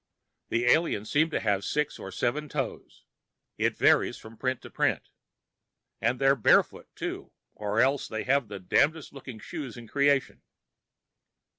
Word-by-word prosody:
The 120 +1 0
aliens 120 -6 +2
seem 155 +2 +3
to - - -1
have 100 -1 0
six 150 +4 -1
or 95 - -7
seven 150 +10 -1
toes. 135 -4 -5 0.6
It - - +1
varies - - +3
from 110 +1 -13
print 130 +1 -2
to - - -11
print. - - 0 0.9
And 120 +3 +1
they're 135 +1 +4
barefoot, 115 - +3
too, - - -5 0.2
or 105 +1 -2
else 135 +1 +2
they 110 - -4
have 135 -2 +2
the 100 -1 -7
damnedest 145 - +1
looking 135 -4 -9
shoes 135 -1 -7
in 120 -1 -10
creation. 140 +2 +1
130 Hz, 150 wpm, -28 LUFS, 110-145 Hz, 0.9 s, they're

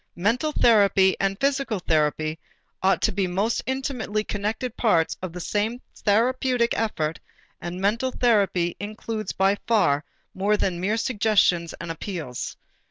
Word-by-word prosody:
Mental 235 - +1
therapy 200 -7 +4
and 195 0 0
physical 275 -4 0
therapy 155 -2 0 0.4
ought 190 +1 +2
to 220 - +3
be 195 -1 0
most 200 +6 0
intimately 255 -5 -2
connected 215 +4 -3
parts 170 -9 +2
of 185 -2 -4
the 180 - -7
same 215 +6 -1 0.2
therapeutic 240 +3 +1
effort 165 -8 -1 0.4
and 175 +1 -5
mental 220 +7 +1
therapy 200 -9 +1
includes 215 +1 -4
by 195 +1 +2
far 155 -11 +3 0.3
more 205 +3 +1
than 180 -4 -1
mere 210 +4 0
suggestions 210 -8 +2
and 170 0 -5
appeals. 160 - -5
205 Hz, 135 wpm, -24 LUFS, 180-230 Hz, 0.4 s, therapy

